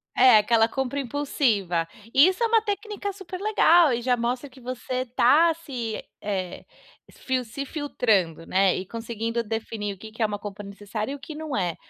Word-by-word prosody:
É, 250 -3 +7
aquela 225 +1 +4
compra 265 +3 -2
impulsiva. 230 - 0 0.3
E 275 +5 +7
isso 375 +5 0
é - - +4
uma 450 -1 +4
técnica 410 -1 -3
super 380 -2 -8
legal, 350 -7 +5
e 240 0 -1
já 250 +1 +2
mostra 245 +3 -2
que 260 -1 -17
você 255 +1 -4
tá 285 +7 +4
se 250 -9 -5 0.2
eh, 190 -3 -4 0.5
fil 260 -1 -2
se 250 +5 -6
filtrando, 220 - 0
né, 190 -1 +3
e 185 - -4
conseguindo 230 +2 -3
definir 220 -2 -4
o - - -23
que 220 +3 -11
que 225 - -9
é - - +4
uma 210 -1 -2
compra 205 0 -8
necessária 205 +4 -5
e - - -4
o - - -11
que 280 +3 -9
não 305 -4 -4
é. 175 -4 -1
240 Hz, 190 wpm, -25 LUFS, 210-285 Hz, 0.5 s, É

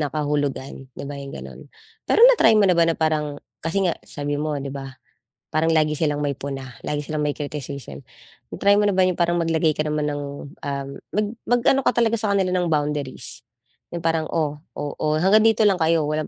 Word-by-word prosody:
na 145 -3 -1
kahulugan, 145 -2 -2
'di - - -6
ba, 145 - -6
yung 140 0 -7
gano'n? - - -9 0.5
Pero 460 - +6
na-try 485 - +6
mo 200 - +5
na 180 - +4
ba 170 - +4
na 165 - +1
parang, 150 -2 0 0.2
kasi 165 +5 -1
nga 175 - +1
sabi 145 0 -4
mo 150 -1 -1
nga - - -4
'di 140 - -5
ba, 135 -1 -7 0.6
parang 160 +1 +2
lagi 155 -1 +2
silang 150 -2 0
may 140 -2 -1
puna, 135 -3 -6
lagi 150 0 -1
silang 150 0 -2
may 145 - 0
criticism, 140 - -6 0.5
na-try 200 0 +3
mo 205 - +3
na 200 - +2
ba 190 - +4
yung 185 -1 +1
parang 175 0 +2
maglagay 160 -1 +2
ka 155 - -1
naman 150 -1 -1
ng, 145 0 -2 0.4
um, 140 -1 -3 0.2
mag 210 +1 +1 0.2
mag-ano 245 +3 +3
ka - - +3
talaga 230 -1 +3
sa 210 -2 0
kanila 190 -2 +1
ng 180 -2 +1
boundaries? 145 -3 -2 0.5
Yung 170 - -5
parang, 165 -1 +1
"Oh 150 -2 -1 0.2
oh 145 -1 -4
oh, 155 0 +1
hanggang 200 +5 +5
dito 220 0 +3
lang 195 -3 +3
kayo, 160 -1 +3
walang 155 0 -2
155 Hz, 215 wpm, -23 LUFS, 145-175 Hz, 0.6 s, Pero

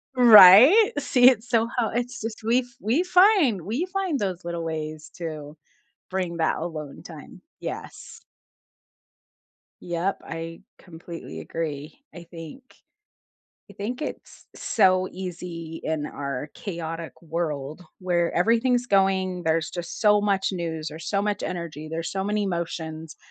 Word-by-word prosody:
Right? 245 - +9
See, 255 -3 +6
it's 240 -2 -2
so 230 -1 +2
How 230 -3 +1
it's 245 +3 -3
just 220 0 -6
we 230 +3 +3
f 255 - -4 0.2
we 245 +11 +1
find 360 - +4
We 235 - -2
find 370 -6 -2
those 185 -3 -3
little 170 -1 -4
ways 155 -1 -5
to 155 -3 -7 0.5
bring 185 -2 -2
that 160 - +1
alone 155 -3 -6
time. - - -12 0.2
Yes. - - -8 1.6
Yep, 175 +3 -2
I 165 0 -7 0.2
completely 170 0 -10
agree. 155 - -5
I 175 - -10
think 165 - -11 1.1
I - - -11
think 245 +8 -5
it's - - -8
so 185 -3 +2
easy 170 -3 -7
in 155 -2 -2
our 140 -1 -5
chaotic 165 -4 -6
world 155 -2 -4 0.2
where 175 -2 0
everything's 235 +5 +2
going, 190 -3 +1
there's 160 0 0
just 175 -1 -6
so 210 -1 +5
much 200 -2 +1
news 165 -3 -4
or 155 - -9
so 200 +5 -1
much 205 0 -2
energy, 165 -4 -5
there's 165 0 -4
so 190 0 -3
many 210 +1 0
emotions 165 -4 -4
180 Hz, 135 wpm, -24 LUFS, 165-220 Hz, 1.6 s, Right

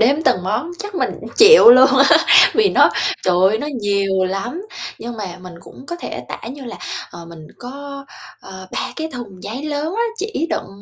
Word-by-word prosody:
đếm 275 +7 +2
từng 245 -10 +1
món 225 - -3
chắc 415 -2 -8
mình 365 - -1
cũng - - -9
chịu 445 - +8
luôn 255 +2 +7
á, 320 +4 +6 0.4
vì 435 -2 +3
nó, - - +4 0.3
trời 180 -1 +2
ơi, 215 +2 -1
nó 290 - -5
nhiều 200 -2 0
lắm. 195 - -4 0.4
Nhưng 235 0 -8
mà 185 -4 -7
mình 180 -1 -11
cũng 185 +9 -15
có 345 - -6
thể - - -7
tả - - -8
như 270 +2 -9
là, 235 - -8 0.3
ờ, 170 0 -11
mình 165 -2 -13
có, 275 +2 -9 0.4
ờ, 190 0 -12
3 - - -4
cái 320 0 -4
thùng 210 -8 -10
giấy 240 +7 -6
lớn 305 +4 -3
á, 465 - 0
chỉ 415 -6 -3
đựng - - -3
245 Hz, 205 wpm, -18 LUFS, 195-310 Hz, 0.4 s, chịu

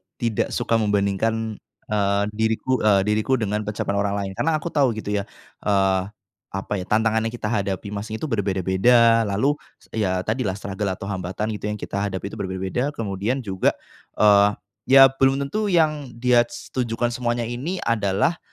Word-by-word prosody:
tidak 115 -3 -1
suka 115 -2 +1
membandingkan, 105 +2 0 0.3
eee, 100 -1 +2
diriku, 110 +4 0
eee, 100 -3 +4
diriku 110 +5 +1
dengan 105 -2 -2
pencapaian 100 -1 -1
orang 100 0 0
lain 100 -1 -3
karena 155 +11 0
aku 155 +2 -3
tahu 135 -6 +2
gitu 110 -1 -5
ya, 100 - -3 0.4
eee, 95 -2 +3 0.5
apa 95 +1 -5
ya, 90 - -6
tantangan 110 +1 +2
yang 115 - -6
kita 115 -1 -3
hadapi 100 -1 -2
masing 105 +2 -5
itu - - -8
berbeda-beda. 110 +4 +3
Lalu, 135 +10 +1 0.2
s - - -26
ya 95 -4 0
tadilah 110 -3 -1
struggle 100 0 -4
atau 95 - -10
hambatan 95 +2 -3
gitu 105 0 -4
yang 105 - -2
kita 100 -1 -4
hadapi 100 -1 -3
itu - - -9
berbeda-beda 95 +9 -2
kemudian 110 +4 -2
juga, 95 -3 0 0.4
eee, 105 -1 +5 0.3
ya 135 0 +8
belum 135 +1 +2
tentu 210 +10 -2
yang 155 - +1
dia 120 0 +3
s - - -10
tujukan 120 -1 -1
semuanya 120 0 -1
ini 130 +11 -4
adalah, 110 - +1
110 Hz, 170 wpm, -23 LUFS, 100-120 Hz, 0.5 s, ya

